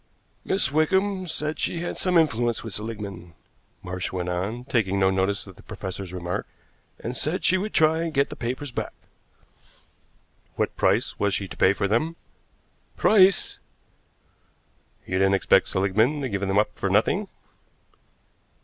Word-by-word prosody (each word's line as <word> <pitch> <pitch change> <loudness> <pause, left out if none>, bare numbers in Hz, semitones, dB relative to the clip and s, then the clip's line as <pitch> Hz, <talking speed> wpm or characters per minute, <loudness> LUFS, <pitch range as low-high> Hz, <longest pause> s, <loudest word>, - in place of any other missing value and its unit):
"Miss 190 -6 0
Wickham 185 +5 +1
said 155 -1 -3
she 170 - -1
had 175 - -3
some 180 -2 +1
influence 120 -7 +1
with 110 -3 -6
Seligmann," 100 -6 -6 0.5
Marsh 90 0 -4
went 90 -1 -3
on, 100 +8 -3
taking 100 -7 +1
no 95 0 +4
notice 95 +1 0
of 95 -3 -13
the - - -14
professor's 95 -3 -6
remark, 90 -1 -4 0.5
"and 120 +2 -5
said 155 +9 -1
she 185 - +5
would 210 +3 -3
try 160 +1 +3
and 165 -1 -2
get 140 -2 +1
the - - -5
papers 130 +3 -4
back." - - -4 1.6
"What - - -1
price - - +1
was 100 -1 +2
she 100 - -2
to - - -10
pay 95 - +4
for 100 0 -1
them?" 155 +11 0 0.8
"Price!" 195 -3 +4 1.5
"You 95 0 -1
didn't 95 0 +4
expect 95 - +3
Seligmann 110 +10 +1
to 135 - -2
give 100 -2 -2
them 95 0 0
up 105 - +1
for - - 0
nothing?" - - +2
110 Hz, 155 wpm, -25 LUFS, 95-155 Hz, 1.6 s, she